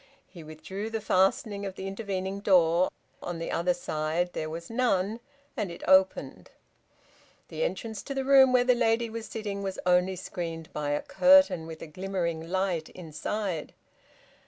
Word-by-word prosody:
He 170 -4 -13
withdrew 190 +7 -6
the 225 0 -3
fastening 200 +1 +1
of 195 -2 -5
the 190 - -7
intervening 195 -1 -4
door, 180 -3 +4 0.3
on 175 -1 -5
the 165 - -4
other 175 +1 +1
side 165 +1 -2
there 155 - -3
was 165 +1 -7
none, 225 -3 0 0.4
and 200 - -2
it 170 - -9
opened. 190 0 +3 1.0
The - - -3
entrance 225 - -3
to 275 - -5
the 270 -1 -1
room 270 -1 +7
where 250 -1 +4
the 250 0 +4
lady 230 -1 +1
was 225 0 -6
sitting 205 -3 -5
was 195 -1 -4
only 180 +1 +3
screened 165 -3 -6
by 150 -1 -2
a 145 0 -1
curtain, 270 - +5
with 160 -1 -8
a - - -5
glimmering 170 -1 -3
light 185 -4 -1
inside. 180 +1 -4
190 Hz, 160 wpm, -28 LUFS, 170-220 Hz, 1.0 s, room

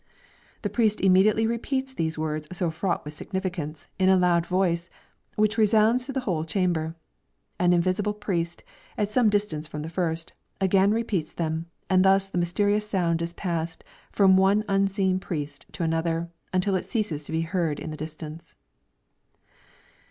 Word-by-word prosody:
The - - 0
priest 220 -3 +2
immediately 195 +4 +4
repeats 260 +4 -2
these 160 -7 -2
words 155 -1 -2
so 180 -2 -1
fraught 175 +1 -2
with 150 - -6
significance, 175 -4 -4
in 190 0 +4
a 190 - +6
loud 175 -2 +3
voice, 180 -2 +1 0.5
which 215 +1 +2
resounds 220 +3 +4
through 270 - -4
the 265 - 0
whole 175 -9 -1
chamber. 165 -2 -1 0.6
An 180 0 +4
invisible 185 +4 +1
priest, 175 -5 -2 0.3
at 210 0 0
some 230 0 +4
distance 200 -7 -1
from 150 -1 -6
the 160 - -6
first, 165 -2 -2 0.3
again 195 +1 +4
repeats 210 -7 -1
them, 160 0 -2 0.2
and 185 -1 +4
thus 195 0 +4
the 185 -2 -2
mysterious 205 +4 +1
sound 170 -4 +1
is 170 0 -3
passed 165 -3 -3 0.3
from 190 -2 +5
one 195 +3 +4
unseen 195 -1 +1
priest 145 -6 -5
to - - -3
another, 165 +1 -1 0.2
until 185 +2 +1
it 185 - -1
ceases 205 -11 -2
to - - -8
be 160 0 0
heard 165 -2 -1
in 160 - -6
the - - -5
distance. 155 +1 -8
185 Hz, 160 wpm, -26 LUFS, 165-205 Hz, 0.6 s, a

